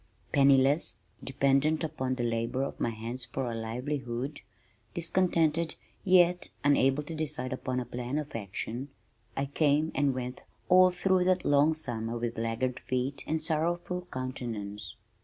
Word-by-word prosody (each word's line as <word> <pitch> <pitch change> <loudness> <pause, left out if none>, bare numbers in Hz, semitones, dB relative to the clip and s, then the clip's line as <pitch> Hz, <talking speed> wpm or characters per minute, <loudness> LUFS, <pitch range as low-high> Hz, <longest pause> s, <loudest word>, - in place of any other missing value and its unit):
Penniless, 140 +2 +4 0.3
dependent 140 +4 +2
upon 130 -4 -2
the 125 - -2
labor 115 +3 0
of 140 - -5
my - - +1
hands 115 +3 -5
for 135 +2 -3
a - - -4
livelihood, 125 +3 -3 0.5
discontented 165 -2 +1 0.3
yet 180 -1 +4
unable 140 0 +3
to 165 - -7
decide 150 -4 -3
upon 130 0 -2
a 125 - -3
plan 125 +3 -3
of 150 -3 -4
action, 115 +5 -4 0.5
I 135 - +1
came 150 +2 +2
and 140 -1 +2
went 125 0 -5 0.3
all 185 0 +7
through 185 0 +2
that 185 0 +2
long 145 +2 +4
summer 120 -6 -3
with 115 -1 -3
laggard 120 +2 -1
feet 130 +2 -2
and 155 0 -1
sorrowful 175 +3 -1
countenance. 110 -6 -5
135 Hz, 140 wpm, -30 LUFS, 120-155 Hz, 0.5 s, all